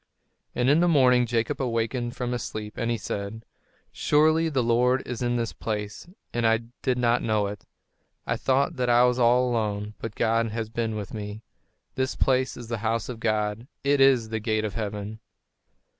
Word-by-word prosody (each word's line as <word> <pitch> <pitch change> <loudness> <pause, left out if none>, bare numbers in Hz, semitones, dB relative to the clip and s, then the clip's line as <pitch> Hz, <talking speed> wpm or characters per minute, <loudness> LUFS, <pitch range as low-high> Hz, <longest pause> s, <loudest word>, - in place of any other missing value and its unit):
And 125 0 +1
in 145 +4 +5
the 175 - +3
morning 125 -6 +4
Jacob 115 +2 -1
awakened 120 0 -1
from 125 -1 -3
his 120 -1 -2
sleep, 105 -1 -6
and 115 -1 -2
he 120 - 0
said: 100 +2 -5 0.5
"Surely, 155 +2 +3
the 135 -5 0
Lord 125 +3 +2
is 125 -1 -5
in 120 0 0
this 115 -1 -2
place, 105 +4 -5 0.3
and 120 - -1
I 115 0 +3 0.2
did 130 -2 0
not 120 0 +2
know 110 -2 +1
it! 100 0 -7 0.6
I - - 0
thought 140 +4 +1
that 125 -1 0
I 120 0 +6
was 125 0 +2
all 125 +1 +4
alone, 105 -3 -2
but 115 -2 -6
God 115 0 +1
has 110 0 -4
been 115 -1 -2
with 105 -2 -6
me. 105 0 -6 0.5
This 130 0 -1
place 130 0 +1
is 120 - -8
the 115 -1 -3
house 115 +2 -1
of 120 -3 -6
God; 110 +1 -1 0.2
it 140 0 +3
is 130 -5 +5
the 110 0 -2
gate 110 0 0
of 105 - -4
heaven!" 105 0 -4
115 Hz, 190 wpm, -26 LUFS, 110-125 Hz, 0.6 s, I